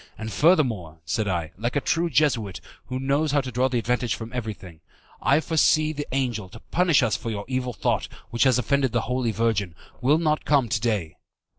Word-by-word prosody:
And, 110 0 -5
furthermore," 120 - +2
said 110 +3 -1
I, 85 -4 -2
like 120 +4 -2
a - - +3
true 170 +4 0
Jesuit, 120 - +1 0.3
who 130 0 -3
knows 140 +3 +1
how 145 - +3
to 130 -1 -6
draw 125 +2 +1
advantage 125 -1 0
from 115 +1 -8
everything, 105 -8 -6 0.4
"I 140 - +4
foresee 155 -1 +2
that 145 -1 -5
the - - -4
angel, 115 -8 -2
to - - -12
punish 170 -6 +2
us 110 -5 +1
for 115 - -4
your 100 -2 -4
evil 130 -1 -2
thought, - - 0 0.2
which 115 +2 +2
has 130 -3 +4
offended 130 +1 +1
the 120 - +2
Holy 125 -1 -1
Virgin, 105 -6 0 0.3
will 145 +5 +4
not 155 -2 0
come 140 -6 +2
to 105 -2 0
day. 105 -9 -1
125 Hz, 200 wpm, -25 LUFS, 110-140 Hz, 0.4 s, I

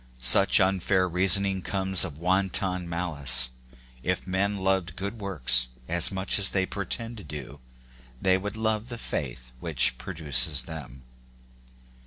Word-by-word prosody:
Such 65 +11 +6
unfair 95 -1 0
reason 95 +3 +2
ing 95 -1 -3
comes 95 -1 +6
of 80 -7 -6
wanton 90 0 -1
malice: 70 -8 0 0.5
if 90 +6 -3
men 100 +2 -2
loved 95 -3 -2
good 100 +4 -6
works 65 - +1 0.2
as 85 +1 +1
much 95 +1 -1
as 100 - +5
they 95 -1 -1
pretend 115 +4 -5
to 105 - -10
do, 75 -2 -10 0.6
they 95 +4 +2
would 100 +3 -5
love 110 +1 -3
the 120 - -7
faith 65 - -6
which 75 -3 -2
produces 75 -2 +1
them. 65 -6 -11
90 Hz, 140 wpm, -25 LUFS, 75-95 Hz, 0.6 s, Such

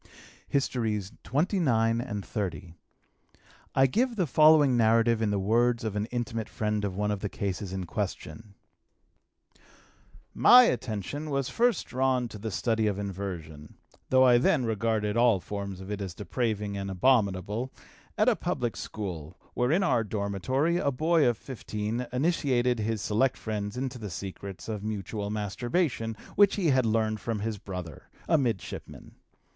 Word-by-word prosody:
HISTORIES 110 -7 -1
XXIX 125 - +1
AND 105 -6 -5
XXX. 90 -6 -4 1.0
I 135 - +5
give 235 - +1
the 185 -5 +1
following 150 -1 +5
narrative 115 0 +3
in 110 - +1
the 105 - 0
words 115 +4 +2
of 110 -2 -3
an 105 +1 -1
intimate 115 -2 -3
friend 105 -1 -2
of 100 -2 -2
one 105 +1 0
of 105 - -2
the 100 - -3
cases 95 -1 -4
in 95 -1 -4
question: 105 +2 -5 1.8
"My 250 +1 +8
attention 130 - -2
was 140 -2 -1
first 240 0 +1
drawn 130 -1 0
to 105 - -9
the 110 +2 -4
study 110 +2 0
of 100 -2 -1
inversion 90 -7 -6 0.3
though 130 0 +5
I 120 -2 +6
then 130 0 +2
regarded 110 -1 0
all 120 -4 +4
forms 100 +1 -6
of 95 +2 -8
it 105 -1 -3
as 95 -3 -5
depraving 105 0 -2
and 100 0 -4
abominable 105 +2 +1 0.5
at - - +3
a - - +5
public 120 -5 -2
school, 90 -6 -6 0.2
where 125 +2 +1
in 185 +5 +3
our 120 -11 +2
dormitory 110 - -1
a 145 - +1
boy 155 +2 +2
of 120 -2 +1
15 115 -1 -4
initiated 125 -4 +1
his 110 -1 -2
select 125 +5 +1
friends 105 0 -4
into 130 -1 -3
the 105 -2 -6
secrets 95 +1 -7
of 105 -3 -4
mutual 105 -1 -4
masturbation, 115 - -1 0.2
which 205 -1 +5
he 180 -6 +1
had 130 -4 +3
learned 110 -1 +1
from 110 0 -3
his 110 -1 -3
brother, 90 -5 -8 0.2
a 160 -2 +4
midshipman. 115 -7 -4
110 Hz, 155 wpm, -28 LUFS, 100-130 Hz, 1.8 s, My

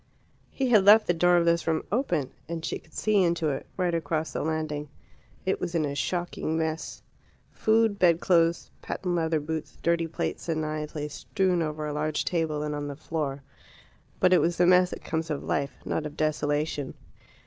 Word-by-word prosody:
He 265 -2 -1
had 210 -4 +6
left 210 +2 +8
the 175 - +2
door 175 +1 +4
of 170 - +3
this 170 0 +2
room 160 -1 +1
open, 180 - 0 0.2
and 165 -1 -4
she - - -3
could 160 - -23
see 215 -2 +2
into 170 -3 +1
it, 135 - -4
right 180 -2 +1
across 160 -1 -1
the - - -2
landing. 155 -2 -2 0.6
It 190 - 0
was 175 -1 -3
in 160 -2 +2
a 140 - -3
shocking 165 +1 -2
mess. 160 0 -3 0.5
Food, 220 -2 +2
bedclothes, 170 -1 +3
patent 180 -2 -3
leather 160 -2 +1
boots, 155 +1 -5
dirty 170 0 +2
plates, 165 - -4
and 160 -1 0
knives 155 0 -4
lay 150 -1 -2
strewn 180 +4 0
over 155 -1 -3
a 150 - -3
large 150 +1 -1
table 160 -3 -1
and 150 0 -2
on 145 0 -3
the 145 - -5
floor. 145 -2 -4 0.8
But 185 0 +4
it 180 - +5
was 170 0 +1
the 180 - +4
mess 180 0 +5
that - - -8
comes 160 0 -2
of 150 -2 -3
life, 140 -2 -1
not 155 - -1
of 150 - -12
desolation. 150 -2 -1
160 Hz, 190 wpm, -27 LUFS, 150-175 Hz, 0.8 s, left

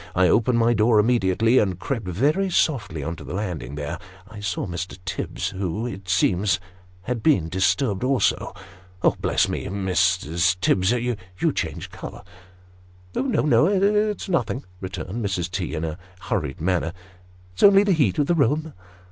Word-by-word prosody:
I 90 0 +4
opened 120 +1 +3
my 115 +1 +3
door 110 0 +3
immediately, 115 +1 +3
and 95 -4 0
crept 115 -1 -4
very 145 - +1
softly 105 - 0
on 85 +3 -3
to - - -10
the - - -6
landing; 90 -8 -4
there 75 0 -4 0.3
I 105 +1 -11
saw 100 -3 -2
Mr. 90 +1 -5
Tibbs, 95 - -3
who, 95 +4 -3
it 95 -5 -7
seems, 90 +1 +2 0.4
had 120 +2 -3
been 100 - +2
disturbed 100 - +1
also. 130 0 +1 0.7
Bless - - +2
me, - - -3
Mrs. 90 -2 +1
Tibbs, 95 0 +2
you 115 -7 -2
change - - -4
colour! - - -9 0.3
" 90 0 -27
" 90 0 -27
No, 265 -4 +1
no 155 +1 +4
it's 205 +2 +1
nothing," 125 - -1 0.2
returned 95 +4 -5
Mrs. 90 -3 -2
T. 90 -4 -3
in 80 +1 -2
a 80 +2 -5 0.2
hurried 80 -7 -3
manner; 85 0 0 0.3
" 90 0 -27
it's - - -8
only 200 0 +7
the 205 - +1
heat 140 - +2
of 145 - +2
the 175 - +2
room." 155 +1 +1
95 Hz, 165 wpm, -23 LUFS, 90-125 Hz, 0.7 s, only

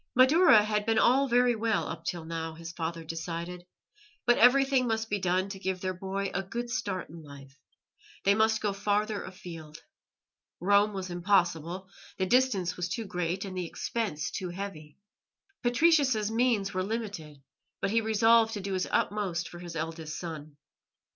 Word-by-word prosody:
Madaura 260 - +6
had 210 0 -1
been 225 0 +2
all 265 +5 +4
very 245 -1 +3
well 220 -1 0
up - - -6
till 170 -3 -4
now, 165 0 -4
his 165 0 -8
father 165 0 -4
decided, 170 +2 -6 0.6
but 240 - +4
everything 265 +1 +5
must 225 -1 -2
be 205 - +1
done 185 +1 +1
to 195 -1 -7
give 190 -1 -2
their 185 0 -2
boy 195 +2 -3
a 195 - 0
good 235 +6 -5
start 190 -5 -2
in 165 0 -10
life; 140 -2 -13 0.7
they 200 - +5
must 220 +1 +2
go 205 -2 0
farther 205 +1 0
afield. 165 -4 -9 0.8
Rome 205 +3 +3
was 190 -2 -5
impossible; 175 -1 0 0.3
the 190 - 0
distance 215 -6 +2
was 180 0 -3
too 225 +4 -3
great 180 0 -2
and 190 -1 -7
the 180 -2 -3
expense 190 -6 -3
too 185 - -4
heavy. 175 -5 -7 0.6
Patricius's 250 -4 +3
means 225 -4 +1
were 185 - 0
limited, 190 -9 -5 0.4
but - - -1
he 230 +1 +3
resolved 225 +1 +4
to - - -3
do 195 0 -4
his 185 -1 -1
utmost 185 -5 -1
for 175 - -10
his 175 -1 -8
eldest 160 -1 -4
son. 155 -4 -7
195 Hz, 165 wpm, -29 LUFS, 170-220 Hz, 0.8 s, Madaura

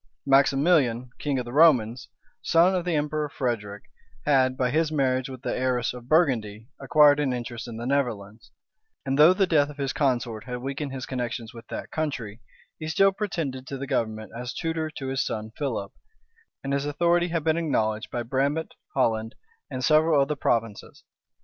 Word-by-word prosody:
Maximilian, 135 -3 +3
king 145 -2 -1
of 125 - -2
the 120 - -8
Romans, 130 -7 +4 0.3
son 170 +3 +4
of 180 -2 -1
the 175 -2 0
emperor 150 0 -1
Frederick, 105 -7 -3 0.4
had, 130 -3 +3
by 125 -1 +1
his 155 +2 +1
marriage 130 -3 0
with 130 -2 -9
the - - -2
heiress 125 -1 0
of 125 0 -11
Burgundy, 115 -10 +1
acquired 145 +1 +5
an 145 -3 +1
interest 120 -1 -5
in 115 -2 -7
the 120 - -5
Netherlands; 115 -5 -2 0.6
and 135 +1 -1
though 155 +4 +9
the 195 - +3
death 150 -5 +2
of 150 - -11
his 135 -2 -2
consort 120 -6 -1
had 125 -1 -4
weakened 135 +3 -4
his 130 -2 -5
connections 120 -3 -4
with 115 -1 -12
that - - -7
country, 125 -9 -4 0.4
he 155 - -5
still 195 +5 +4
pretended 160 -10 -4
to 135 - -5
the 140 - -5
government 110 -5 -2
as 125 +1 -6
tutor 160 -1 -2
to 135 -3 -6
his 135 0 0
son 110 0 -4
Philip, 120 -9 -3 0.7
and 135 0 -2
his 140 +1 -1
authority 170 +4 +2
had 165 -2 -2
been 160 0 +2
acknowledged 110 -9 -1
by 120 -1 -3
Brabant, 140 +6 -1 0.2
Holland, 110 -3 0 0.3
and 130 0 -3
several 155 -1 +4
of 135 - +3
the 150 - 0
provinces. 115 -6 -2
135 Hz, 180 wpm, -25 LUFS, 120-150 Hz, 0.7 s, though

